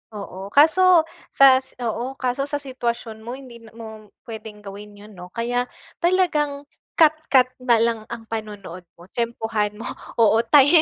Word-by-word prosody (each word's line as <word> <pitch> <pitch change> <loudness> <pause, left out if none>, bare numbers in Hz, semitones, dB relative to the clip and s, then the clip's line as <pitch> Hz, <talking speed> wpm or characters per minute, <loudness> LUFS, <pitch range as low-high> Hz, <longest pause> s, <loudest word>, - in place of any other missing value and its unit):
Oo. 195 -1 -7
Kaso 335 +3 +5 0.2
sa 265 -1 +6
s 265 - -12
oo. 240 +4 -3
Kaso 265 +1 -2
sa 290 - -3
sitwasyon 235 -4 -4
mo 240 +3 -7
hindi 255 -3 -12
na 225 -1 -17
mo 220 -2 -10 0.2
pwedeng 220 -2 -10
gawin 205 +1 -10
yun 210 +1 -14
no? 180 -2 -11
Kaya 245 +1 -1 0.3
talagang 310 -6 +1 0.3
cut-cut 310 -5 +4
na 240 -2 +3
lang 230 0 +1
ang 235 -1 -7
panonood 210 -5 -7 0.2
mo, 170 - -15
tiyempohan 225 -3 -2
mo 225 - -8 0.3
Oo 225 -1 +4
ti 290 +5 +6
235 Hz, 155 wpm, -22 LUFS, 215-275 Hz, 0.3 s, sa